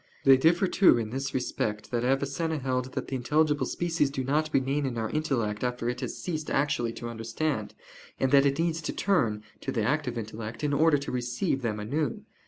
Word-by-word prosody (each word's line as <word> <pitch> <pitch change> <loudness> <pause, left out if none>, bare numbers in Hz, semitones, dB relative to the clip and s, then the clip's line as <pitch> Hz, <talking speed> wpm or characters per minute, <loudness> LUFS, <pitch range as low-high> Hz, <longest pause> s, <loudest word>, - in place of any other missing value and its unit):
They 135 -1 +8
differ, 170 +8 +3
too, 190 -5 +5
in 110 -2 -3
this 135 +2 -3
respect, 110 -4 -2
that 120 -1 0
Avicenna 140 +5 0
held 130 -2 -2
that - - -3
the - - -6
intelligible 150 +4 +1
species 165 -4 0
do 135 -1 -3
not 150 +4 +1
remain 135 +1 +1
in 120 -3 -4
our 110 -1 -2
intellect 125 -9 -1
after 125 -1 -2
it 125 0 -4
has - - -4
ceased 155 -4 -4
actually 135 -4 +1
to 120 - -6
understand, 115 +2 -3 0.4
and 130 - +1
that 140 0 +6
it 140 0 0
needs 165 -1 0
to - - -3
turn 115 - +1 0.2
(to - - -4
the 110 - 0
active 125 0 0
intellect) 110 +2 -6
in 145 -1 +1
order 155 +1 +4
to 140 - -5
receive 125 +1 -1
them 110 -3 -2
anew. 150 - -2
135 Hz, 200 wpm, -28 LUFS, 120-155 Hz, 0.4 s, They